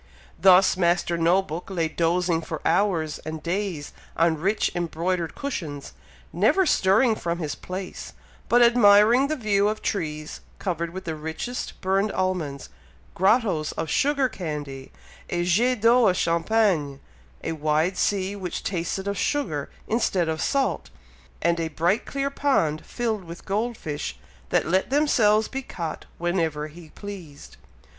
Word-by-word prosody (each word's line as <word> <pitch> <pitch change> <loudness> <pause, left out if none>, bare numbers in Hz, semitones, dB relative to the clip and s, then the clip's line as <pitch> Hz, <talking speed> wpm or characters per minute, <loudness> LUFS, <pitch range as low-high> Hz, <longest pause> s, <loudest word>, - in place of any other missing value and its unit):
Thus 190 +2 +6
Master 175 -1 +2
No 170 +3 +3
book 170 +1 -7
lay 170 -4 0
dozing 170 +1 +1
for 160 -1 -5
hours 165 -7 +1
and 155 0 -7
days 175 -4 -3 0.2
on 165 -1 +2
rich 200 +6 +1
embroidered 170 0 -2
cushions, 160 - -5 0.4
never 380 -1 +3
stirring 220 - +4
from 170 -5 -3
his 155 -4 -3
place, 185 0 -7 0.4
but 240 +1 +6
admiring 235 +2 +6
the 310 - -1
view 205 -6 +1
of 215 +1 -1
trees 155 -5 -3 0.2
covered 170 -3 -2
with 190 +3 -8
the 160 - -2
richest 160 +11 -5
burned 195 +2 +1
almonds, 175 -7 -2 0.4
grottoes 190 -5 +2
of 160 - -4
sugar 280 -2 +2
candy, 150 - -6 0.4
a 175 0 0
jet 220 +7 +2
d'eau 235 +1 +5
of 185 -1 +2
champagne, 170 -4 +1 0.4
a - - -2
wide 155 +3 0
sea 195 0 0
which 185 -3 -5
tasted 190 +1 -3
of 200 -2 -2
sugar 170 - -1 0.2
instead 195 -6 +1
of 160 0 -2
salt, 275 -1 0 0.5
and 170 0 +2
a 165 - -1
bright 170 +7 0
clear 275 0 -2
pond, 165 - +1
filled 225 -5 -2
with 170 0 -10
gold 220 +4 -1
fish, 145 - -5 0.3
that - - +2
let 185 +4 +1
themselves 225 -7 +3
be 270 - -4
caught 170 -10 -6
whenever 165 -4 -1
he 160 +1 -13
pleased. 180 -7 -10
180 Hz, 145 wpm, -25 LUFS, 160-210 Hz, 0.5 s, Thus